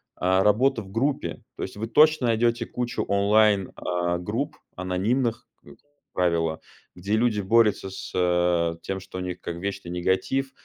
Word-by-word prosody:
а, 95 +1 +2
работы 115 +3 +3
в 95 - -13
группе. 135 +7 -1
То - - -5
есть 95 - -6
вы 110 +2 -3
точно 155 +1 +4
найдёте 115 +1 +1
кучу 125 -1 -3
онлайн, 100 0 +3
а, 90 0 -1
групп 120 - -3 0.2
анонимных, 105 +7 -1 0.2
э, - - -14 0.4
правило, 85 -3 0 0.3
где 95 +4 -4
люди 110 -2 +1
борются 105 -1 +3
с, 90 -3 0
тем, 95 +2 -3
что 95 - -10
у - - -3
них 90 -1 -5
как 85 - -5
вечный 100 0 -5
негатив, 95 +10 0
100 Hz, 150 wpm, -25 LUFS, 90-115 Hz, 0.4 s, точно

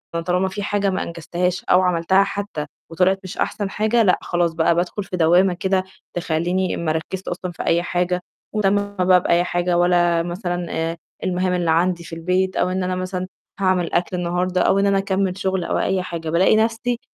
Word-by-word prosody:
أنا 170 - 0
طالما 180 +1 +1
في 195 +2 -5
حاجة 200 -1 0
ما 185 - -1
أنجزتهاش 175 +2 -2
أو 180 - +4
عَمَلتها 180 +2 +3
حتى 200 -6 -4 0.2
وطلعِت 185 +3 +2
مش 185 - -8
أحسن 200 -2 -2
حاجة، 220 +3 +2
لأ 180 -3 +3
خلاص 175 -1 0
بقى 165 +1 +2
بادخل 180 +4 -1
في 180 - -5
دوّامة 175 +3 +4
كده 190 +1 0 0.3
تخلّيني 175 +2 -1
ما 165 -2 -1
أركّزش 160 +4 -4
أصلًا 180 0 -4
في - - -6
أي 170 +1 +2
حاجة 180 0 -1 0.3
ولا 210 -2 +2
مهتمة 200 -1 0
بقى 180 -1 +5
بأي 170 0 +2
حاجة 175 0 0
ولا 175 -1 +3
مثلًا، 175 0 -3
آآ، 165 +1 -2 0.3
المهام 185 0 0
اللي 175 -2 +1
عندي 170 +1 +1
في 165 0 -8
البيت، 185 +3 0
أو - - +1
إن 185 0 -1
أنا 185 0 -1
مثلًا 185 0 -3 0.3
هاعمل 185 -2 +1
أكل 180 +1 0
النهارده، 180 +1 0
أو 195 - +3
إن 200 - +2
أنا 200 0 +3
أكمّل 195 -1 0
شغل 190 -2 -1
أو - - -1
أي 190 -1 0
حاجة، 165 -3 -5
بالاقي 175 +6 +4
نَفْسي 230 +2 0
180 Hz, 200 wpm, -21 LUFS, 175-190 Hz, 0.3 s, بقى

